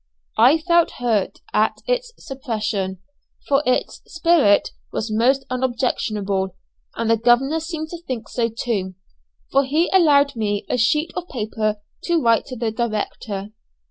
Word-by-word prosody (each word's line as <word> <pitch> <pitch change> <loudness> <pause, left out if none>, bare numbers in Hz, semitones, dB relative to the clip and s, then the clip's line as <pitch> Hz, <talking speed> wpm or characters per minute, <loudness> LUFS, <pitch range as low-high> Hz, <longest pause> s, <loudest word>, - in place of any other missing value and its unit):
I 255 +8 +7
felt 340 +1 +2
hurt 220 -6 0
at 215 +1 +2
its - - -1
suppression, 215 -9 -3 0.5
for 275 0 +3
its 255 - 0
spirit 325 -11 +3 0.2
was 220 0 -3
most 265 +5 +2
unobjectionable; 215 -7 -1 0.4
and 230 - -2
the 230 0 +4
governor 245 +7 +3
seemed 320 -1 -5
to 340 0 -8
think 245 -4 -4
so 235 -2 -1
too, 205 -5 -3 0.6
for 275 +1 +4
he 305 +6 +1
allowed 290 -7 +5
me 205 -2 -1
a - - 0
sheet 300 +8 +2
of 360 -1 -5
paper 215 -3 -2 0.3
to 340 -1 +2
write 230 -5 +2
to 255 - -6
the 230 -2 -2
director. 215 -3 -3
245 Hz, 140 wpm, -21 LUFS, 215-300 Hz, 0.6 s, I